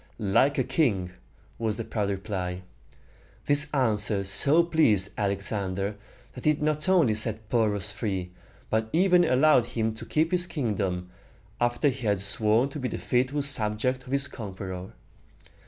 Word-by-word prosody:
"Like 115 +7 +1
a 130 - +2
king!" 120 - 0 0.5
was 110 -2 -2
the 115 - -4
proud 105 -2 -3
reply. 95 -2 -4 0.8
This 145 0 +4
answer 105 -6 +2
so 140 - +5
pleased 135 - +2
Alexander, 100 0 -2 0.4
that 125 - -10
he 155 - +4
not 150 +3 -2
only 165 -12 +4
set 110 0 -2
Porus 105 -4 0
free, 95 -4 -4 0.4
but 110 0 0
even 180 0 +4
allowed 135 -4 +4
him 110 -2 -2
to 110 - -10
keep 160 +2 0
his 180 -1 +1
kingdom, 95 - -3 0.5
after 120 +4 +1
he 125 -3 -5
had 100 -2 +1
sworn 110 +5 +2
to 145 - -7
be 130 - -2
the - - -5
faithful 130 +4 -1
subject 125 0 +1
of - - -9
his 140 0 +1
conqueror. 95 -5 -8
110 Hz, 150 wpm, -26 LUFS, 100-140 Hz, 0.8 s, so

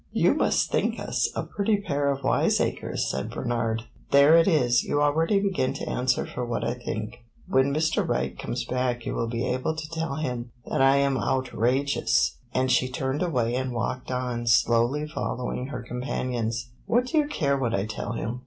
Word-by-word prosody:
"You - - +4
must - - +1
think - - 0
us - - 0
a - - -1
pretty 205 +1 0
pair 145 -7 0
of 140 0 -2
wiseacres," - - +1
said - - -3
Bernard. 115 -2 -2 0.3
"There 140 +3 +7
it 165 +1 +5
is 125 -9 +3
you 145 - 0
already 160 +7 +3
begin 195 -9 0
to - - -5
answer 125 0 0
for 125 - -5
what 120 -1 -2
I 120 - 0
think. 115 -2 -5 0.3
When 130 +1 +3
Mr. 160 +2 +1
Wright - - -1
comes - - -4
back 125 -2 -1
you - - -2
will 115 - -1
be 115 0 -2
able 130 +5 -1
to 155 -1 -6
tell 165 -3 -2
him 125 -5 -3 0.2
that - - -1
I 135 +1 +6
am 140 -1 +2
'outrageous'!" 130 - +1
And 130 0 +1
she 130 0 +3
turned 130 +3 -2
away 125 -10 0
and 130 0 -2
walked 125 +2 -3
on, 125 -2 -2
slowly 120 +5 +3
following 125 -4 -3
her 140 - -6
companions. 120 -1 -3 0.2
"What 245 +2 +3
do 310 +5 +1
you 295 - +1
care 145 - 0
what 120 -3 0
I 100 0 0
tell 110 0 -4
him?" 115 +2 -4
130 Hz, 190 wpm, -26 LUFS, 120-145 Hz, 0.3 s, There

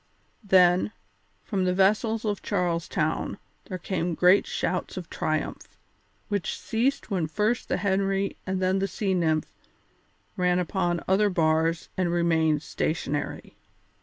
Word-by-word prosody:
Then, 185 +1 +4 0.5
from 195 -4 -1
the 180 0 +1
vessels 215 +4 +2
of 205 -2 -1
Charles 170 -2 -1
Town 155 +1 -1 0.3
there 185 - -5
came 175 -2 -2
great 180 +4 +5
shouts - - -2
of - - -7
triumph, - - -3 0.5
which 200 -3 -2
ceased 240 +2 -1
when 180 -5 0
first 210 +9 -1
the - - +1
Henry 195 0 0
and 190 0 -1
then 185 +1 +1
the 195 - 0
Sea 195 +1 -1
Nymph 160 -4 0 0.8
ran 180 -1 +2
upon 175 -1 -1
other 205 +2 +3
bars 165 -1 +1
and 180 -2 +1
remained 160 -3 +2
stationary. 150 -2 -3
185 Hz, 135 wpm, -26 LUFS, 170-195 Hz, 0.8 s, great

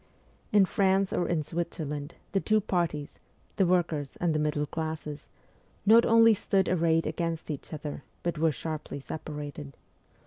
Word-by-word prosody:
In 205 -2 +6
France 190 0 +2
or 175 - 0
in 160 -3 0
Switzerland, 150 -2 -4 0.2
the 195 - +2
two 215 +2 +2
parties 170 -7 -2 0.4
the 190 - +4
workers 160 -6 0
and 170 -2 +1
the 155 - +1
middle 150 -1 0
classes 155 -1 -5 0.6
not 225 +3 +7
only 230 0 +7
stood 195 -2 +1
arrayed 165 -2 +2
against 165 0 -2
each 145 - -7
other, 150 -2 -6 0.2
but 170 -2 -2
were 160 0 +3
sharply 155 +2 -5
separated. 145 -1 -7
160 Hz, 145 wpm, -29 LUFS, 150-185 Hz, 0.6 s, not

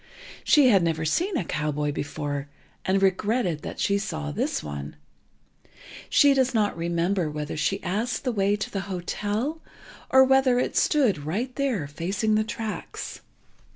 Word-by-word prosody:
She 285 -4 +5
had 195 -5 +5
never 165 -1 0
seen 350 - 0
a 185 - -2
cowboy 150 -1 -1
before, 145 -1 -4 0.4
and 195 +1 +2
regretted 195 -3 +1
that - - -7
she 200 0 +2
saw 75 - -4
this 70 - -2
one. 70 -1 -6 1.1
She 285 -1 +6
does 260 -2 +1
not 210 -2 +2
remember 170 +1 0
whether 150 0 -4
she 195 +6 -1
asked 215 +7 -2
the 255 - 0
way 200 -2 +2
to 210 - -4
the 195 - -2
hotel, 210 - -2 0.5
or 265 0 +7
whether 265 -1 +4
it 250 - -1
stood 250 - +3
right 225 - -3
there, 260 - 0
facing 190 +9 -1
the 215 0 +3
tracks. 220 0 -6
195 Hz, 155 wpm, -25 LUFS, 155-245 Hz, 1.1 s, or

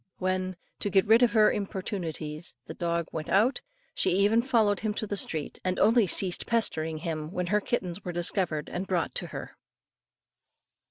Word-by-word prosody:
When, 185 0 -1 0.2
to 205 - -1
get 195 -1 +3
rid 225 +3 +5
of 245 - +4
her 215 -2 +5
importunities, 175 -6 -4
the - - -7
dog 170 -1 -1
went 155 -1 -5
out, 215 +9 +3 0.3
she - - +1
even 210 +4 +4
followed 220 -5 +2
him 215 -2 -2
to 220 - -2
the 205 - -3
street, 160 -6 -2
and 185 0 -1
only 225 0 +4
ceased 180 +1 +1
pestering 160 -9 0
him, 155 -1 -4
when 180 -1 -2
her 210 - +3
kittens 190 -4 -3
were 180 - -4
discovered 175 -2 0
and 185 +2 -4
brought 180 -3 -1
to - - -2
her. - - -8
185 Hz, 175 wpm, -28 LUFS, 170-210 Hz, 0.3 s, rid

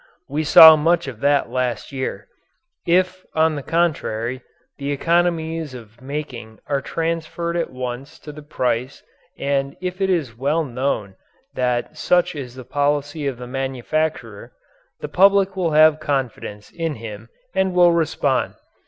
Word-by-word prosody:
We 150 +3 -2
saw 160 +1 +10
much 165 +1 +1
of 125 -5 -7
that 140 +1 +2
last 125 -3 -2
year. 130 -7 -4 0.6
If, 185 +1 +2
on 160 0 +3
the 145 - -4
contrary, 130 -7 -1 0.4
the 140 0 -3
economies 165 -1 0
of 115 -1 -13
making 130 -5 -6
are 140 -1 -1
transferred 165 +2 -3
at 170 - -1
once 125 +2 -6
to 150 - -9
the 150 +1 -11
price 130 -3 -2 0.3
and 140 0 -1
if 185 +1 -5
it 190 - +2
is 155 -11 -1
well 145 +7 0
known 125 -7 -3 0.4
that 125 +3 -1
such 180 0 +2
is 130 -4 -7
the 130 -1 -10
policy 145 +1 -1
of 135 -3 -3
the 125 - -8
manufacturer, 135 +4 -3 0.5
the - - -4
public 195 0 +4
will 175 -4 -1
have 155 0 +6
confidence 125 -8 -3
in 165 -3 -3
him 110 -1 -9 0.2
and 190 -1 0
will 175 -1 +6
respond. 160 -5 0
145 Hz, 145 wpm, -21 LUFS, 130-165 Hz, 0.6 s, saw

